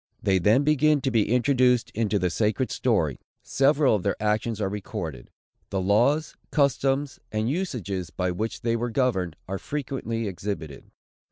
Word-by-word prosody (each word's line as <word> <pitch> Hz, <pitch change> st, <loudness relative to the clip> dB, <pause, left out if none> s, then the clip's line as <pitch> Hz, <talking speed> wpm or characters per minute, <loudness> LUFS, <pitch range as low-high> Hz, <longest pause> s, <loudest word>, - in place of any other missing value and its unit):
They 95 Hz, -2 st, +3 dB
then 110 Hz, +10 st, +4 dB
begin 150 Hz, 0 st, +3 dB
to 135 Hz, -, 0 dB
be 110 Hz, -4 st, +2 dB
introduced 125 Hz, -1 st, +3 dB
into 110 Hz, -1 st, 0 dB
the 90 Hz, -2 st, 0 dB
sacred 110 Hz, +4 st, 0 dB
story. -, -, 0 dB, 0.2 s
Several 140 Hz, 0 st, +3 dB
of 105 Hz, -, +1 dB
their 100 Hz, +2 st, 0 dB
actions 105 Hz, +1 st, 0 dB
are 100 Hz, -, 0 dB
recorded. 85 Hz, -9 st, -5 dB, 0.4 s
The 95 Hz, -, -1 dB
laws, 120 Hz, +11 st, +2 dB
customs, 140 Hz, -1 st, +1 dB
and 110 Hz, +1 st, -1 dB
usages, 105 Hz, -, -3 dB
by 90 Hz, +2 st, -2 dB
which 110 Hz, +6 st, -3 dB
they 115 Hz, 0 st, 0 dB
were 120 Hz, +1 st, -1 dB
governed, 110 Hz, -, 0 dB
are 95 Hz, +1 st, -3 dB
frequently 130 Hz, -6 st, -3 dB
exhibited. 90 Hz, -6 st, -6 dB
110 Hz, 155 wpm, -25 LUFS, 100-135 Hz, 0.4 s, then